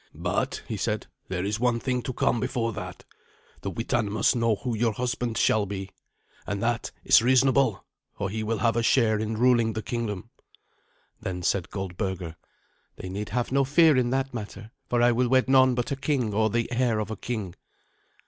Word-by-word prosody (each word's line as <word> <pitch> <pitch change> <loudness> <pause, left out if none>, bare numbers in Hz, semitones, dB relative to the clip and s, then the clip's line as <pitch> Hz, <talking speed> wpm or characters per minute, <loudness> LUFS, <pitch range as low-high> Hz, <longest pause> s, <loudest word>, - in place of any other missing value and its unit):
"But," - - -2
he - - -3
said, - - -2 0.2
"there 90 0 -2
is 105 +2 -1
one 120 -1 +2
thing 125 0 -1
to 130 - -4
come 120 - +1
before 115 0 -1
that. 90 -3 -8 0.6
The 100 - -3
Witan 115 0 -1
must 110 +4 +2
know 115 -2 +2
who 120 +3 -3
your 115 0 +1
husband 120 -1 -2
shall 105 -2 +2
be. 95 -1 -5 0.6
And 100 - -2
that 115 0 -1
is - - +6
reasonable, 130 -2 +3 0.3
for 100 - -2
he 110 +1 -3
will 110 +1 -1
have 115 0 +1
a 120 - +2
share 115 -2 +3
in 110 0 -2
ruling 120 -2 +3
the 110 - -4
kingdom." 105 -5 -4 0.9
Then 90 -1 -5
said 90 -1 0
Goldberga, 95 -3 -4 0.6
"They 95 - -7
need 100 +3 -4
have 120 +5 -2
no 140 +1 +3
fear 150 +3 +5
in 125 -2 +2
that 135 +1 -1
matter, 105 -1 -7 0.2
for 120 -1 +2
I 120 - +5
will 120 +1 +1
wed 130 0 +3
none 130 -1 +5
but 120 +2 -2
a - - +1
king 135 -6 -1
or 110 +1 +2
the 115 +3 -1
heir 120 -2 +1
of 110 0 -3
a - - -3
king." 105 -4 -4
115 Hz, 195 wpm, -26 LUFS, 105-125 Hz, 0.9 s, is